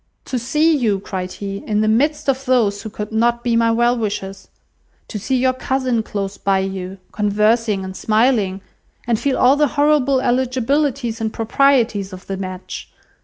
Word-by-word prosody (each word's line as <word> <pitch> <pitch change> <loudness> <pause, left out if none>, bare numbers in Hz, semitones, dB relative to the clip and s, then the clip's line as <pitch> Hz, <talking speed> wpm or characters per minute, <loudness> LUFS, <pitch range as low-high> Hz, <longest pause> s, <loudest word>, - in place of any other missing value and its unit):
"To 255 - -2
see 305 +7 +2
you," 220 -8 +1
cried 185 -2 -5
he, 195 -1 -5
"in 210 -1 +1
the 215 - +1
midst 295 +7 +1
of 270 0 0
those 225 -6 +2
who 220 - -6
could 210 0 -6
not 235 +2 +1
be 235 -1 +1
my 230 0 +3
well 240 +1 +2
wishers; 200 -4 -4 0.6
to 210 - -5
see 260 +6 -1
your 255 0 +2
cousin 255 -2 -1
close 200 -2 -5
by 195 -1 +2
you, 190 0 -4
conversing 210 0 +1
and 190 0 -7
smiling, 215 -3 +1 0.4
and 235 -2 +1
feel 275 -2 0
all 255 +2 +5
the 295 0 +3
horrible 285 -2 +3
eligibilities 255 -1 0
and 220 -1 -1
proprieties 225 -4 +2
of 185 +1 -10
the 195 - -4
match! 185 -1 -7
230 Hz, 170 wpm, -19 LUFS, 200-260 Hz, 0.6 s, all